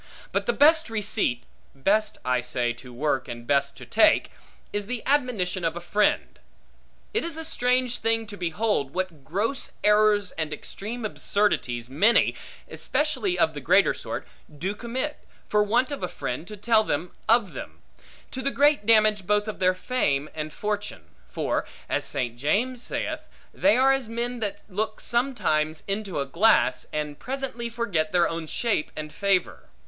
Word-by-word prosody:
But -, -, -1 dB
the -, -, +4 dB
best 315 Hz, -, +5 dB
receipt 205 Hz, -, 0 dB, 0.3 s
(best, 205 Hz, +10 st, +1 dB
I 125 Hz, -1 st, +2 dB
say, 120 Hz, -1 st, 0 dB
to 125 Hz, +1 st, -13 dB
work, 135 Hz, +1 st, -1 dB
and 120 Hz, -1 st, -7 dB
best 140 Hz, +1 st, +1 dB
to -, -, -9 dB
take) -, -, +4 dB, 0.4 s
is 205 Hz, -1 st, -2 dB
the 250 Hz, -1 st, -4 dB
admonition 240 Hz, -10 st, +1 dB
of 165 Hz, 0 st, 0 dB
a -, -, -3 dB
friend. 205 Hz, +4 st, 0 dB, 0.7 s
It 445 Hz, -, +1 dB
is 335 Hz, -1 st, -3 dB
a 320 Hz, -, -4 dB
strange 250 Hz, -4 st, +1 dB
thing 225 Hz, 0 st, +1 dB
to 205 Hz, -, -8 dB
behold, 175 Hz, -5 st, -1 dB
what 180 Hz, -6 st, -3 dB
gross 210 Hz, -, -2 dB
errors 210 Hz, -1 st, +4 dB
and 160 Hz, -1 st, -3 dB
extreme 220 Hz, +8 st, -6 dB
absurdities 165 Hz, -, 0 dB
many 185 Hz, -, +4 dB, 0.3 s
(especially 310 Hz, +5 st, -1 dB
of -, -, +3 dB
the -, -, -6 dB
greater -, -, +4 dB
sort) -, -, -6 dB, 0.2 s
do 170 Hz, +7 st, -3 dB
commit, 255 Hz, +7 st, -4 dB, 0.3 s
for 210 Hz, -, +3 dB
want 235 Hz, +6 st, +2 dB
of 285 Hz, -, -4 dB
a 180 Hz, -, -1 dB
friend 155 Hz, 0 st, -5 dB
to 210 Hz, 0 st, -8 dB
tell 220 Hz, +1 st, +3 dB
them 170 Hz, -2 st, -2 dB, 0.2 s
of 225 Hz, -3 st, +4 dB
them; -, -, -8 dB, 0.5 s
to 260 Hz, -, -4 dB
the 275 Hz, -, 0 dB
great 285 Hz, -5 st, +3 dB
damage 215 Hz, -3 st, +4 dB
both 210 Hz, +1 st, +2 dB
of 215 Hz, -, -5 dB
their 185 Hz, 0 st, +3 dB
fame 155 Hz, -, 0 dB
and 155 Hz, -1 st, -4 dB
fortune: 205 Hz, -, -4 dB, 0.2 s
for, -, -, -1 dB, 0.2 s
as -, -, 0 dB
St. 120 Hz, -2 st, -2 dB
James 230 Hz, -, 0 dB
saith, -, -, -2 dB, 0.3 s
they 290 Hz, -3 st, +4 dB
are 265 Hz, +1 st, +5 dB
as 270 Hz, -4 st, -2 dB
men 240 Hz, +1 st, -3 dB
that 210 Hz, -3 st, -3 dB
look 215 Hz, +2 st, -3 dB
sometimes 210 Hz, -, 0 dB
into 195 Hz, -4 st, -2 dB
a 140 Hz, -, 0 dB
glass, 170 Hz, -, +3 dB
and 150 Hz, -1 st, -3 dB
presently 255 Hz, -2 st, -4 dB
forget 200 Hz, -10 st, -1 dB
their 175 Hz, -1 st, +4 dB
own 165 Hz, -1 st, -4 dB
shape 220 Hz, -3 st, 0 dB
and 155 Hz, 0 st, -6 dB
favor. 195 Hz, -3 st, 0 dB
210 Hz, 165 wpm, -26 LUFS, 155-235 Hz, 0.7 s, best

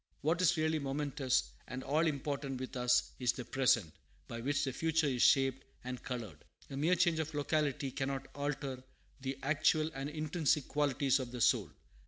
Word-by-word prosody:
What 165 Hz, +4 st, +1 dB
is 175 Hz, -1 st, +4 dB
really 160 Hz, 0 st, +1 dB
momentous 140 Hz, -2 st, 0 dB, 0.2 s
and 130 Hz, +1 st, -5 dB
all 155 Hz, +4 st, +2 dB
important 140 Hz, -2 st, -2 dB
with 130 Hz, +1 st, -6 dB
us 125 Hz, 0 st, +2 dB
is 125 Hz, -2 st, +2 dB
the 125 Hz, -, -6 dB
present, 125 Hz, -11 st, +2 dB, 0.3 s
by 115 Hz, 0 st, -6 dB
which 145 Hz, +3 st, 0 dB
the 135 Hz, -2 st, -1 dB
future 160 Hz, +2 st, +1 dB
is 130 Hz, -4 st, 0 dB
shaped 135 Hz, -1 st, +4 dB, 0.2 s
and 125 Hz, 0 st, -5 dB
colored. 120 Hz, -4 st, -6 dB, 0.3 s
A -, -, -4 dB
mere 160 Hz, +6 st, +3 dB
change 170 Hz, -2 st, +2 dB
of 160 Hz, -1 st, -3 dB
locality 145 Hz, -2 st, 0 dB
cannot 135 Hz, +1 st, -3 dB
alter 140 Hz, -2 st, -3 dB, 0.4 s
the 135 Hz, 0 st, -4 dB
actual 155 Hz, +2 st, +2 dB
and 135 Hz, +2 st, -4 dB
intrinsic 155 Hz, -1 st, 0 dB
qualities 140 Hz, -2 st, +2 dB
of 130 Hz, -2 st, -4 dB
the 125 Hz, -, -6 dB
soul. -, -, +3 dB
140 Hz, 175 wpm, -34 LUFS, 130-150 Hz, 0.4 s, is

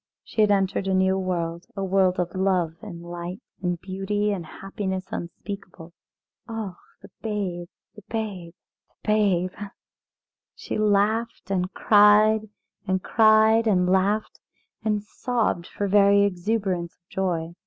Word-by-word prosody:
She 220 Hz, -, -1 dB
had 210 Hz, -, +4 dB
entered 195 Hz, -1 st, +1 dB
into 190 Hz, -, +1 dB
a -, -, +3 dB
new 190 Hz, 0 st, +2 dB
world, 170 Hz, -2 st, -3 dB
a 195 Hz, -, -3 dB
world 190 Hz, -1 st, +2 dB
of 175 Hz, -1 st, -1 dB
love 185 Hz, -4 st, +1 dB
and 175 Hz, -6 st, -9 dB
light 175 Hz, +2 st, -6 dB, 0.2 s
and 175 Hz, -2 st, -1 dB
beauty 195 Hz, +3 st, -2 dB
and 190 Hz, -4 st, -3 dB
happiness 190 Hz, -1 st, -4 dB
unspeakable. 175 Hz, -1 st, -7 dB, 0.5 s
Oh! 220 Hz, -6 st, -5 dB, 0.3 s
the -, -, -13 dB
babe 195 Hz, -6 st, -3 dB, 0.3 s
the 210 Hz, -, -13 dB
babe 195 Hz, -7 st, -4 dB, 0.3 s
the -, -, -22 dB
babe! 195 Hz, -4 st, +2 dB, 1.0 s
She -, -, -4 dB
laughed 215 Hz, +1 st, +1 dB
and 185 Hz, -1 st, 0 dB
cried, 215 Hz, +1 st, +5 dB, 0.4 s
and 185 Hz, 0 st, 0 dB
cried 220 Hz, +1 st, +5 dB
and 180 Hz, -4 st, +3 dB
laughed 200 Hz, +3 st, +1 dB, 0.4 s
and 210 Hz, -2 st, 0 dB
sobbed 220 Hz, -5 st, -1 dB
for 205 Hz, -, -3 dB
very 200 Hz, 0 st, +5 dB
exuberance 190 Hz, -2 st, -1 dB
of 175 Hz, -, -53 dB
joy. 170 Hz, -3 st, -2 dB
195 Hz, 135 wpm, -25 LUFS, 180-210 Hz, 1.0 s, cried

